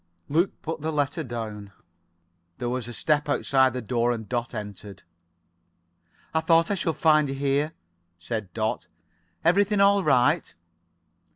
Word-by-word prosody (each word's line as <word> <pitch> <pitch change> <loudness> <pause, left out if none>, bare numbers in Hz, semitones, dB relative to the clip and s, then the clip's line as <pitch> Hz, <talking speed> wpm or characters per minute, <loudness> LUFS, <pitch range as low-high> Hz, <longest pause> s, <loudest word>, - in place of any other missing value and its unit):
Luke 170 +6 +1
put 160 -1 -4
the 160 +1 -2
letter 145 +1 -1
down. 110 -5 -6 0.8
There 120 - -3
was 125 -1 -3
a - - -6
step 150 +4 0
outside 130 -2 +3
the 125 -2 -4
door 120 +1 +1
and 110 -3 -4
Dot 120 0 -3
entered. 105 -1 -8 1.3
"Thought 165 +2 +3
I - - +3
should 170 -4 -1
find 155 -3 +3
you 135 - -3
here," 140 +3 0 0.4
said 105 +2 -5
Dot. 110 +1 -2 0.6
"Everything 200 +4 +3
all 200 0 +5
right?" 150 - +2
140 Hz, 135 wpm, -25 LUFS, 120-160 Hz, 1.3 s, all